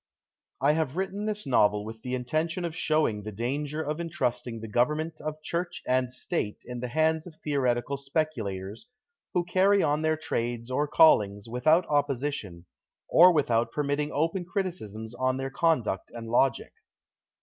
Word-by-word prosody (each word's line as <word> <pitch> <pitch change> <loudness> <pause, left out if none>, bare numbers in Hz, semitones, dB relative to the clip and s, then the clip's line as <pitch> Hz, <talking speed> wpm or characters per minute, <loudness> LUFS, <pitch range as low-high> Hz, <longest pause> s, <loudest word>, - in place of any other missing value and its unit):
HAVE 150 +1 +2
written 195 +2 -2
this 210 -1 -3
novel 105 -5 +3
with 110 0 -8
the 125 +1 -3
intention 155 +8 -1
of 165 -1 -4
showing 155 -11 +1
the 110 +1 -6
danger 140 +8 -2
of 155 +3 -3
entrusting 125 -8 -2
the 110 - -7
govern 125 +8 +2
ment 160 0 -5
of 155 0 -4
Church 175 +2 -3
and 130 -1 +1
State 130 - -3
in 125 0 -6
the 125 - -3
hands 160 +4 +1
of 165 - -12
theo 145 -2 0
retical 125 +2 0
speculators, 125 - -3 0.5
who 175 - +3
carry 190 +3 +3
on 150 0 +1
their 155 0 +1
trades 120 -4 -3
or 145 +3 +1
callings 105 -10 +4
without 155 +9 +3
opposition, 140 - -1 0.4
or 180 +2 +8
without 120 -7 +1
permitting 145 +2 -1
open 165 +5 0
criticisms 165 - -4
on 130 +1 0
their 135 0 -3
conduct 135 - 0
and 115 -1 -7
logic. 120 +2 +1
145 Hz, 160 wpm, -28 LUFS, 120-160 Hz, 0.5 s, or